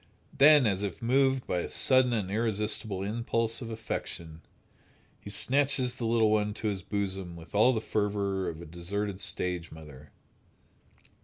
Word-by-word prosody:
Then, 145 -1 +6
as 100 -3 0
if 100 -3 -4
moved 130 +2 +1
by 90 - -1
a - - -4
sudden 130 -2 +5
and 105 -5 -2
irresistible 105 -2 -1
impulse 115 +2 -1
of 115 - -6
affection, 85 -7 -6 0.8
he - - -10
snatches 130 +3 +1
the 115 - -3
little 115 -1 +3
one 105 -1 0
to 110 - -2
his 100 -2 -4
bosom 95 -3 -4
with 85 0 -13
all 110 +5 +5
the 110 -4 -2
fervor 100 -4 -1
of 80 - -7
the 85 - -10
deserted 95 +4 -4
stage 90 -2 -2
mother. 75 -2 -13
105 Hz, 155 wpm, -28 LUFS, 95-115 Hz, 0.8 s, Then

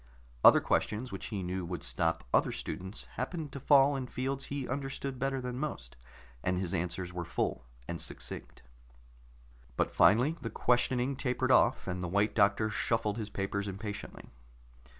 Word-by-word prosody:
Other - - +9
questions 110 +3 0
which 95 - -5
he 100 -4 -3
knew 90 +1 -2
would 85 -2 -5
stop 85 0 0
other - - +4
students 95 +3 -5
happened 160 -5 -3
to 140 - -6
fall 140 +1 +5
in 130 -2 -3
fields 135 +2 -3
he 140 -2 -4
understood 135 0 -3
better 135 0 0
than 125 0 -4
most, 140 - -4 0.5
and 90 0 +1
his 90 -2 -2
answers 90 +1 -2
were 90 -1 -3
full 60 - -2 0.2
and 85 - -3
succinct. - - -6 1.1
But - - +1
finally 125 +10 +5
the 115 - -3
questioning 125 +3 +2
tapered 130 0 0
off, 130 0 +4
and 90 0 -2
the 90 - -2
White 100 +4 +1
Doctor 105 +1 +3
shuffled 110 0 0
his 110 -1 -4
papers 100 +1 -2
impatiently. 100 +1 -6
110 Hz, 160 wpm, -31 LUFS, 95-130 Hz, 1.1 s, Other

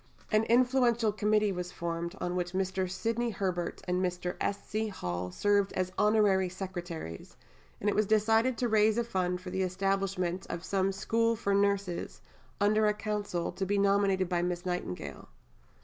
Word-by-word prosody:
An 215 0 +3
influential 240 -2 +3
Committee 210 0 +2
was 180 -1 -4
formed, 170 +1 -4
on 180 0 -2
which 180 0 -2
Mr. 190 0 -1
Sidney 230 +5 -1
Herbert 185 -4 -3
and 180 +1 +1
Mr. 180 0 -2
S. 200 - -2
C. 220 +1 -1
Hall 90 - -4
served 200 - +2
as 185 0 -1
honorary 205 -3 +3
secretaries, 175 - -7 0.4
and 205 - -3
it 205 - +2
was 215 -1 +2
decided 225 +3 +3
to 245 - +1
raise 215 0 +3
a 235 - +2
fund 180 -5 -1
for 185 0 -7
the 190 - -1
establishment 190 -1 -1
of 170 0 -4
some 195 0 +1
School 230 +4 +1
for 200 -2 -1
Nurses, 200 -2 0 0.4
under 215 +1 +3
a 210 - +2
Council, 205 -4 -2
to 195 - -4
be 200 +2 +1
nominated 200 -1 +3
by 175 -1 0
Miss 175 0 -2
Nightingale. 90 - -4
195 Hz, 165 wpm, -30 LUFS, 180-215 Hz, 0.4 s, An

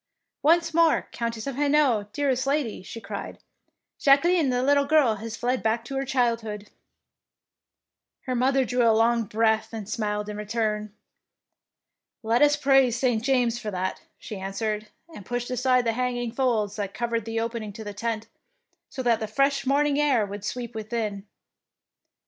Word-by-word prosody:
Once 330 +2 +3
more 335 0 +3
Countess 230 -2 -4
of 275 -2 -4
Hainault, 280 -8 +2
dearest 270 0 0
lady,^^ 275 -9 -1
she 230 - -8
cried, 200 -1 -7 0.6
"Jacqueline 300 +2 +4
the 250 0 0
little 280 +1 +3
girl 280 -7 +3
has 225 +2 -6
fled 250 +1 -1
back 225 +1 0
to 270 - -6
her 270 0 -1
child 245 -3 +1
hood.^' 210 -2 -7 1.5
Her 255 - -3
mother 260 +2 +2
drew 245 0 0
a 230 - +5
long 230 +1 +3
breath 220 +1 +1
and 220 -3 -6
smiled 210 -1 -2
in 210 0 -5
return. 210 0 -2 1.3
"Let 230 +3 +2
us 295 0 +6
praise 270 -4 +3
St. 240 -3 +1
James 245 -3 +1
for 215 - -5
that," 185 -1 -3 0.2
she 210 - -8
answered, 210 +2 -3 0.3
and 205 - -9
pushed 245 +4 -4
aside 250 0 +2
the 230 - +1
hanging 245 -1 -2
folds 225 -5 0
that 200 -2 -4
covered 235 -2 -2
the 225 0 -2
opening 230 -2 -3
to 220 - -8
the 205 -1 -6
tent, 225 +1 -3 0.6
so 260 - -5
that 235 -2 +2
the 220 - -3
fresh 275 +5 +1
morning 285 +1 +2
air 265 -8 +3
would 200 0 -7
sweep 240 +2 -4
within. 215 -2 -4
235 Hz, 165 wpm, -25 LUFS, 215-265 Hz, 1.5 s, us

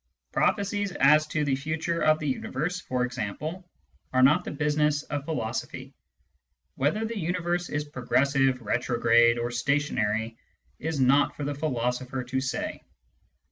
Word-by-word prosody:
Prophecies 200 -1 0
as 150 +2 +5
to 155 -1 -1
the 135 -2 +1
future 160 +4 -2
of 155 0 +4
the 155 - -4
universe, 155 +6 -2
for 125 -7 -1
example, 135 - -5 0.4
are 130 0 +3
not 150 +7 +5
the - - -5
business 150 0 +1
of 145 -1 -4
philosophy; 120 -8 -4 0.8
whether 155 +12 0
the 225 -1 -4
universe 175 0 -1
is 145 0 -1
progressive, 135 -1 +1
retrograde, 120 +1 +3
or 120 0 -2
stationary, 115 -5 0 0.4
it 155 - -5
is 160 -3 -2
not 135 +2 +4
for 150 - -5
the 145 +1 -2
philosopher 130 -2 -2
to 130 +2 -2
say. 130 - -3
140 Hz, 140 wpm, -27 LUFS, 125-155 Hz, 0.8 s, as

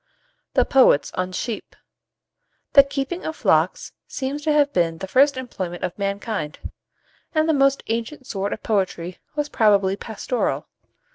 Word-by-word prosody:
THE - - +4
POETS 255 - +4
ON 185 0 -2
SHEEP. 220 +4 -5 1.0
The 280 - +10
keeping 275 +5 -4
of 315 - -4
flocks - - +1 0.2
seems 280 +2 -4
to 305 +1 +1
have 290 -1 +3
been 165 -2 +1
the 190 - -6
first 275 +6 +4
employment 185 -9 -5
of 180 - -2
mankind; 200 -5 -3 0.8
and 310 0 +3
the 320 - +3
most 275 -1 +3
ancient 235 +5 -3
sort 200 -3 -3
of - - -5
poetry 185 -4 -1 0.2
was 295 -1 -1
probably 200 -7 +3
pastoral. 225 +4 -3
230 Hz, 145 wpm, -22 LUFS, 190-280 Hz, 1.0 s, The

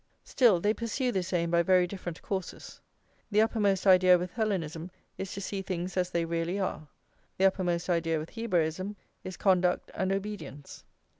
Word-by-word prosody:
Still, 230 -9 +4
they 205 +4 +2
pursue 240 +3 -2
this 190 -4 -2
aim 170 -2 0
by 170 0 +4
very 185 0 +4
different 175 -2 -7
courses. 190 -2 -5 0.5
The 210 0 +3
uppermost 205 -4 +1
idea 185 -1 +7
with 180 0 -4
Hellenism 180 -7 -2 0.3
is 190 - -4
to 200 - -5
see 195 0 -3
things 185 -1 -4
as 180 -1 0
they 170 -2 -1
really 170 +3 -2
are; 185 -5 -3 0.5
the 190 - +3
uppermost 180 -3 +1
idea 165 -2 +1
with 155 +1 -6
Hebraism 185 -3 -1 0.3
is 185 -1 -7
conduct 180 -2 +2
and 190 - -1
obedience. 195 -8 -6
185 Hz, 165 wpm, -29 LUFS, 170-200 Hz, 0.5 s, idea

